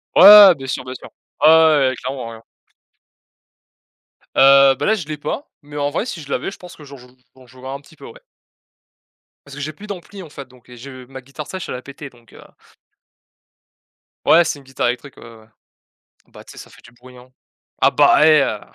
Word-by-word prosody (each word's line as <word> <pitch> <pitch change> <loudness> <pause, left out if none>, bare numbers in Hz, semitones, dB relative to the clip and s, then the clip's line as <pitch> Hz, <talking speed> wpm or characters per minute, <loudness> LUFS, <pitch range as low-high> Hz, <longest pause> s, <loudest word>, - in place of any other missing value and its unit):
Ouais, - - +5
ouais, 200 - +11 0.2
ouais, 175 - +3
bien 135 -1 -10
sûr, 130 - -5
bien 130 0 -9
sûr. - - -13 0.3
Ouais, 155 - +7
ouais, 160 -4 +4
ouais, 130 - -5
clairement, 125 -3 -7
ouais. 115 - -13 1.9
Heu, 135 0 +5
bah, - - -4
là 220 - +2
je 170 -8 -8
l'ai 155 -1 -6
pas. 150 - -6
Mais 145 0 -15
en 145 0 -2
vrai 165 +10 -4
si 170 -9 -8
je 140 - -14
l'avais, - - -3
je - - -13
pense 180 -1 -14
que 150 - -15
j'en 140 0 -13
jou 125 0 -18 0.3
j'en 130 -1 -20
jouerais 130 +1 -13
un 140 - -7
petit 160 - -21
peu, - - -14
ouais. - - -15 1.3
Parce 140 - -13
que 145 - -9
j'ai 155 +2 -6
plus 210 +7 -14
d'ampli 195 0 -10
en 165 - -12
fait 140 -3 -11
donc 125 -1 -23
et 125 - -14
je 130 0 -12
ma 130 0 -12
guitare 140 +3 -11
sèche 190 -2 -8
elle - - -5
a 125 - -8
pété 140 +1 -12
donc 120 -2 -24
heu - - -16 1.8
Ouais 170 +1 +5
c'est 150 -3 -5
une - - -19
guitare 130 -2 -3
électrique, 125 +3 -7
ouais, - - -15
ouais, 115 -1 -14
ouais. 110 - -22 0.8
Bah - - -16
tu - - -15
sais, - - -15
ça - - -13
fait - - -20
du 120 - -19
bruit, 125 +1 -18
hein. 125 +1 -18 0.5
Ah - - +3
bah, 155 - +3
hé 155 -3 +4
heu, 105 -5 -4
140 Hz, 235 wpm, -18 LUFS, 125-155 Hz, 1.9 s, ouais